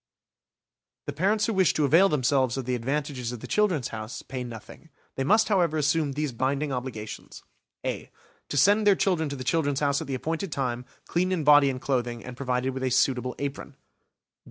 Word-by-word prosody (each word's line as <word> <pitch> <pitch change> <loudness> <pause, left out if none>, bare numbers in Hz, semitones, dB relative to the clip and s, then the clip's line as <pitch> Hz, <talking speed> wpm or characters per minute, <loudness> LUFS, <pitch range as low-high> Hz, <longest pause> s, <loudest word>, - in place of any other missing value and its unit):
The 145 - -4
parents 200 +7 +1
who 225 - -1
wish 185 -8 +3
to 150 - +2
avail 170 +8 +5
themselves 130 -3 +1
of 130 - -3
the 125 - -1
advantages 130 0 -2
of 125 - -6
the - - -8
"Children's 185 - +1
House" 110 +1 -7
pay 130 -1 -5
nothing. 120 +6 -10 0.2
They 135 - -2
must, 215 +9 +4
however, 175 -7 +2
assume 150 -1 +1
these 150 0 -2
binding 135 +4 -1
obligations: 125 -4 -6 0.4
(a) - - -3 0.4
To - - -2
send 205 +7 +4
their 200 - +6
children 175 -6 0
to 140 - -4
the 130 - -6
"Children's 145 0 0
House" 140 -1 +1
at - - -6
the 135 - -2
appointed 160 +6 -3
time, 125 -3 -2 0.2
clean 180 +2 0
in 175 -4 0
body 145 -1 +6
and 130 -1 -3
clothing, 120 -4 -2
and 125 0 -8
provided 130 0 -1
with 130 - -5
a 130 - 0
suitable 125 0 +1
apron. 140 0 -5
140 Hz, 195 wpm, -26 LUFS, 125-160 Hz, 0.4 s, their